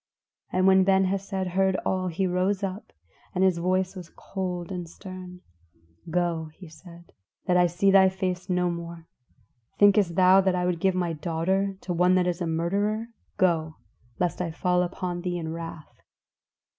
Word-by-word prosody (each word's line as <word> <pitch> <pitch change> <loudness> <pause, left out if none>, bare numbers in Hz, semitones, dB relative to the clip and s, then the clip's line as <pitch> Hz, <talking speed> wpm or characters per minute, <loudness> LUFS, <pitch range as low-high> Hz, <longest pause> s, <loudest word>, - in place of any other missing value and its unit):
And 185 0 +1
when 190 0 +6
Ben 190 0 +3
Hesed 190 0 -2
heard 190 0 +2
all 185 -1 0
he 180 +2 -1
rose 185 +2 0
up, 195 +2 -5 0.4
and 185 - +2
his 185 -3 +3
voice 185 +2 0
was 180 -3 -9
cold 180 -3 -5
and 175 -3 -5
stern. 185 0 -10 0.7
"Go," 165 -2 -1
he 185 - -12
said, 170 +1 -15 0.3
"that 180 - +2
I 180 0 +5
see 180 +3 +2
thy 190 -1 +6
face 185 -1 -3
no 180 -1 +1
more. 170 -1 -7 0.7
Thinkest 200 -4 +4
thou 185 +1 +6
that 190 -1 +1
I 180 0 0
will 180 -1 +1
give 185 +2 +1
my 175 -2 -1
daughter 185 +5 -1
to 180 - -3
one 180 +2 +3
that 185 -1 +3
is 180 0 -2
a 170 - -1
murderer? 200 +7 -1 0.3
Go, 160 -4 +1 0.4
lest 180 0 -1
I 175 - -2
fall 180 +2 +1
upon 175 0 -3
thee 175 0 -2
in 160 -1 -4
wrath." 165 -2 -9
180 Hz, 170 wpm, -26 LUFS, 170-190 Hz, 0.7 s, when